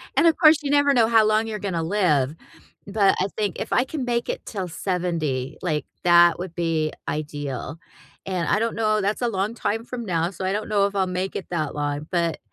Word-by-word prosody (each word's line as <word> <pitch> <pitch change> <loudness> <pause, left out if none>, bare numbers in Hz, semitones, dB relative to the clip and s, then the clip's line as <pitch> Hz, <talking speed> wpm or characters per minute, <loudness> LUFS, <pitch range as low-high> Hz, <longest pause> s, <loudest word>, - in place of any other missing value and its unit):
And, 335 - +5
of 325 - +4
course, 315 -2 +7
you 285 - -3
never 285 -1 +4
know 230 -4 +4
how 225 -2 +5
long 215 +1 +2
you're 215 -2 -4
gonna 180 -5 -2
live, 160 -6 +1 0.5
but 200 -1 +3
I 185 - +1
think, 205 -4 -2
if - - -5
I 250 - +4
can 265 0 -4
make 240 -1 -1
it - - -4
'till 190 -4 -4
70, 165 -8 -2
like, 155 -4 -1 0.2
that 175 -1 +6
would 180 -2 -6
be 165 -3 0 0.2
ideal, 145 0 -4 0.5
and 180 -4 -2
I 210 - +2
don't 230 0 -1
know, 215 -1 +1
that's 205 +5 -1
a 245 - +1
long 205 0 -1
time 225 0 -2
from 240 -1 -6
now, 170 -3 0
so 190 0 -6
I 190 - 0
don't 210 +1 -3
know 200 -2 +3
if 200 0 -3
I'll 190 -1 +1
make 185 +1 -3
it 190 - -5
that 155 -5 -2
long, 145 +1 -3
but 170 -3 0
190 Hz, 225 wpm, -23 LUFS, 165-220 Hz, 0.5 s, course